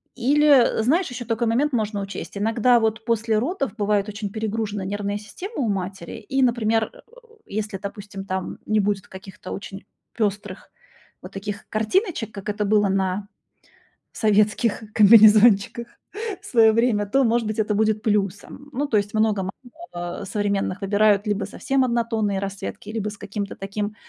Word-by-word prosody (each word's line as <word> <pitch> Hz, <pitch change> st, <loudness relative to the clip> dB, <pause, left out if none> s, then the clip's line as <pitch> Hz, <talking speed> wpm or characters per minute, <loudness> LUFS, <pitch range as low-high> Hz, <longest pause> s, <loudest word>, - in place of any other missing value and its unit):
Или, 275 Hz, -2 st, +4 dB
знаешь, 320 Hz, +9 st, +2 dB
ещё 245 Hz, -1 st, -6 dB
такой 230 Hz, +1 st, -1 dB
момент 265 Hz, +6 st, +1 dB
можно 215 Hz, -3 st, -1 dB
учесть: 200 Hz, 0 st, -7 dB
иногда 230 Hz, +3 st, +3 dB
вот 220 Hz, 0 st, -1 dB
после 225 Hz, -2 st, +1 dB
родов 275 Hz, -, -2 dB
бывает 205 Hz, -1 st, +1 dB
очень 205 Hz, 0 st, -5 dB
перегружена 215 Hz, -1 st, -3 dB
нервная 205 Hz, +1 st, -2 dB
система 360 Hz, -, -9 dB
у -, -, 0 dB
матери, 190 Hz, -3 st, -4 dB
и, 270 Hz, -, +2 dB
например, 225 Hz, -2 st, +1 dB
а, -, -, -16 dB, 0.5 s
если, 210 Hz, 0 st, -4 dB
допустим, 200 Hz, 0 st, -7 dB
там 190 Hz, -1 st, -4 dB
не 215 Hz, 0 st, +2 dB
будет 200 Hz, -1 st, -1 dB
каких-то 190 Hz, 0 st, -10 dB
очень 195 Hz, 0 st, -7 dB, 0.4 s
пёстрых 205 Hz, -2 st, -2 dB, 0.5 s
вот -, -, -10 dB
таких 205 Hz, +1 st, -6 dB
картиночек, 225 Hz, -, 0 dB
как 200 Hz, +1 st, -6 dB
это 210 Hz, 0 st, -1 dB
было 205 Hz, -1 st, +3 dB
на 190 Hz, +1 st, -1 dB, 0.9 s
советских 215 Hz, +1 st, +2 dB
комбинезончиках 215 Hz, +1 st, +6 dB, 0.5 s
в -, -, -16 dB
своё 225 Hz, -3 st, +5 dB
время, 225 Hz, -3 st, +2 dB
то, 270 Hz, +7 st, +2 dB
может 235 Hz, -1 st, +2 dB
быть, 215 Hz, +1 st, -3 dB
это 215 Hz, 0 st, +1 dB
будет 215 Hz, 0 st, +1 dB
плюсом. 210 Hz, +6 st, -2 dB
Ну, 285 Hz, +3 st, -1 dB
то 225 Hz, -, +2 dB
есть 205 Hz, 0 st, -1 dB
много 215 Hz, -3 st, +1 dB
мам 190 Hz, -, -4 dB, 0.7 s
современных 200 Hz, 0 st, -1 dB
выбирают 205 Hz, +1 st, +3 dB
либо 205 Hz, -1 st, 0 dB
совсем 265 Hz, +6 st, 0 dB
однотонные 225 Hz, -4 st, 0 dB
расцветки, 195 Hz, +1 st, -6 dB
либо 215 Hz, -2 st, -2 dB
с 205 Hz, -, -10 dB
каким-то 205 Hz, -1 st, -5 dB
таким, 205 Hz, +2 st, -4 dB
215 Hz, 155 wpm, -23 LUFS, 200-230 Hz, 0.9 s, комбинезончиках